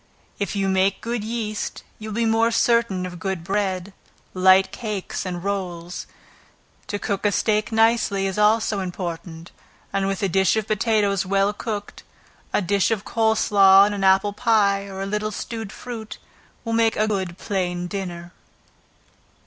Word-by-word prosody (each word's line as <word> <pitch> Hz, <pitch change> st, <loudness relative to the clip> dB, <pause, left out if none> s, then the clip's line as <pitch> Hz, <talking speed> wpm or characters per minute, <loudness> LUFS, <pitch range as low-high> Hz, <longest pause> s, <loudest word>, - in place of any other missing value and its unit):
If 200 Hz, 0 st, -2 dB
you 195 Hz, -1 st, 0 dB
make 190 Hz, +1 st, +2 dB
good 235 Hz, -2 st, -3 dB
yeast 215 Hz, -1 st, -4 dB, 0.2 s
you 215 Hz, 0 st, -7 dB
will 210 Hz, -, -5 dB
be 230 Hz, 0 st, +1 dB
more 225 Hz, +1 st, +3 dB
certain 230 Hz, -5 st, +2 dB
of 175 Hz, -1 st, -7 dB
good 190 Hz, -1 st, -3 dB
bread, 190 Hz, 0 st, -2 dB, 0.4 s
light 190 Hz, +1 st, +5 dB
cakes 205 Hz, -3 st, -4 dB
and 175 Hz, -1 st, -5 dB
rolls. 180 Hz, -3 st, -4 dB, 0.8 s
To 205 Hz, -, -2 dB
cook 200 Hz, -1 st, -3 dB
a 205 Hz, -, +3 dB
steak 215 Hz, +2 st, +1 dB
nicely, 225 Hz, -3 st, +2 dB
is 195 Hz, +1 st, -2 dB
also 215 Hz, 0 st, +3 dB
important; 175 Hz, -2 st, -6 dB, 0.4 s
and 195 Hz, 0 st, 0 dB
with 195 Hz, 0 st, -2 dB
a -, -, +3 dB
dish 190 Hz, +2 st, +2 dB
of 220 Hz, -2 st, -1 dB
potatoes 210 Hz, -2 st, +1 dB
well 195 Hz, +1 st, +1 dB
cooked, 205 Hz, -1 st, -5 dB, 0.5 s
a -, -, +1 dB
dish 200 Hz, +2 st, +2 dB
of 220 Hz, -3 st, -1 dB
cold 220 Hz, -1 st, +1 dB
slaw 195 Hz, -2 st, +6 dB
and 205 Hz, -, -1 dB
an 200 Hz, -1 st, -3 dB
apple 195 Hz, +2 st, +4 dB
pie, 200 Hz, -3 st, +2 dB
or 195 Hz, 0 st, -5 dB
a -, -, -3 dB
little 210 Hz, +1 st, -2 dB
stewed 220 Hz, -1 st, -6 dB
fruit, 230 Hz, -3 st, -8 dB, 0.5 s
will 230 Hz, -, -2 dB
make 225 Hz, 0 st, +3 dB
a 215 Hz, -, +1 dB
good 190 Hz, -4 st, -2 dB
plain 180 Hz, -4 st, -2 dB
dinner. 175 Hz, -2 st, -6 dB
200 Hz, 165 wpm, -23 LUFS, 190-215 Hz, 0.8 s, slaw